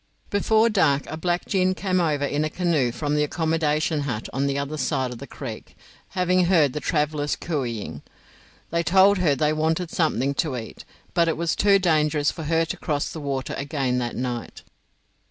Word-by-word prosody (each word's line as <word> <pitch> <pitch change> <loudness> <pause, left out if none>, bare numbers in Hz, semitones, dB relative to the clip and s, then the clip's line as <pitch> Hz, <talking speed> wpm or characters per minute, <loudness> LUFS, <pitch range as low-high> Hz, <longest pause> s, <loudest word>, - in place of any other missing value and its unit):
Before 220 +2 +3
dark 145 -10 +2
a - - -6
black 175 +2 -1
gin 185 -1 +1
came 185 -1 0
over 150 -4 +1
in 145 +1 -1
a 155 - -1
canoe 155 -8 +1
from 145 +4 -2
the 150 - +2
accommodation 160 0 0
hut 125 -7 -3
on 140 +2 0
the 140 0 -1
other 140 +2 -3
side 135 -4 -1
of 120 - -8
the 140 - -8
creek, 115 -6 -8 0.4
having 180 0 +3
heard 160 -7 +3
the 150 - -2
travellers 150 -2 0
cooeying. 125 -10 -4 0.7
They 170 +1 +1
told 190 +3 +5
her 155 -6 +3
they 150 +3 +1
wanted 160 +2 0
something 140 -5 +1
to 140 -2 -1
eat, 110 -2 -8 0.3
but 170 -1 +3
it 165 - 0
was 170 0 0
too 200 -1 +5
dangerous 155 -5 +2
for 160 - -7
her 165 +1 +2
to - - -5
cross 145 -2 -2
the 160 - -6
water 135 -2 -3
again 140 -3 -1
that 120 -1 -3
night. 120 -2 -4
155 Hz, 190 wpm, -24 LUFS, 140-170 Hz, 0.7 s, told